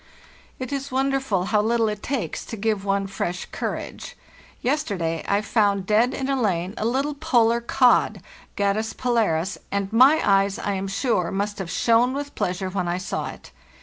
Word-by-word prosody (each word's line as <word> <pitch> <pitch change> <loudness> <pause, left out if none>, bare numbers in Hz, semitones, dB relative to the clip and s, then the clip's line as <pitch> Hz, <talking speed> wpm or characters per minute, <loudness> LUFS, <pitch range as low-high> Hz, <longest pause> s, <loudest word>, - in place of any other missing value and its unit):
"It 255 0 -6
is 275 0 -4
wonderful 265 -7 0
how 210 - +5
little 230 +1 +2
it 210 -1 -3
takes 270 -4 -3
to 225 - -6
give 210 -1 -1
one 195 0 0
fresh 185 -2 -3
courage. - - -5 0.5
Yesterday 200 - -1
I 200 +1 +2
found 200 -2 +1
dead 220 +5 +3
in 265 - -3
a 270 -2 0
lane 185 -3 0
a 215 - -1
little 270 +5 0
polar 240 -6 +2
cod 245 +1 +3 0.4
(Gadus 205 +2 0
polaris), 210 -8 0
and 200 +1 -2
my 265 +7 +6
eyes, 195 0 +3
I 205 - -2
am 195 0 -3
sure, 195 -3 0
must 205 +1 -2
have 190 -3 -4
shone 235 +7 +3
with 285 +1 -5
pleasure 185 +1 -2
when 185 -2 -2
I 175 +1 0
saw 185 - -3
it. - - -12
215 Hz, 175 wpm, -24 LUFS, 195-250 Hz, 0.5 s, my